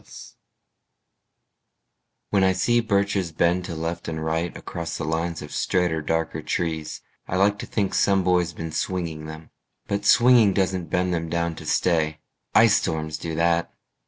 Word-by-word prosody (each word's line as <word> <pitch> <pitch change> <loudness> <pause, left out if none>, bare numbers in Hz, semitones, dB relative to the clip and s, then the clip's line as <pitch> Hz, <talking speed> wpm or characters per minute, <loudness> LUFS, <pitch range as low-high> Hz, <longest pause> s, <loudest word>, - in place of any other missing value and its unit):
BIRCHES - - -13 2.0
When 100 -2 +3
I 95 0 +4
see 120 +6 +2
birches 100 -4 0
bend 85 +3 +1
to 85 -3 -5
left 80 +2 -4
and 80 -1 -4
right 80 +2 -2
Across 85 -1 -5
the - - -4
lines 80 +1 -2
of 75 - -10
straighter 90 -3 0
darker 80 +1 -2
trees, 80 -3 -3 0.3
I - - -3
like 100 +2 +2
to - - -6
think 100 -3 -1
some 100 -1 +3
boy's 90 -1 +2
been 80 -1 -6
swinging 80 -3 -3
them. 80 0 -10 0.3
But 100 0 -3
swinging 120 -3 +6
doesn't 95 -3 0
bend 90 +1 0
them 85 -1 -2
down 85 0 -1
to - - -9
stay. 80 -3 +1 0.4
Ice - - +6
storms 80 -1 -3
do 80 -1 -4
that. 85 +1 +1
85 Hz, 160 wpm, -24 LUFS, 80-95 Hz, 2.0 s, swinging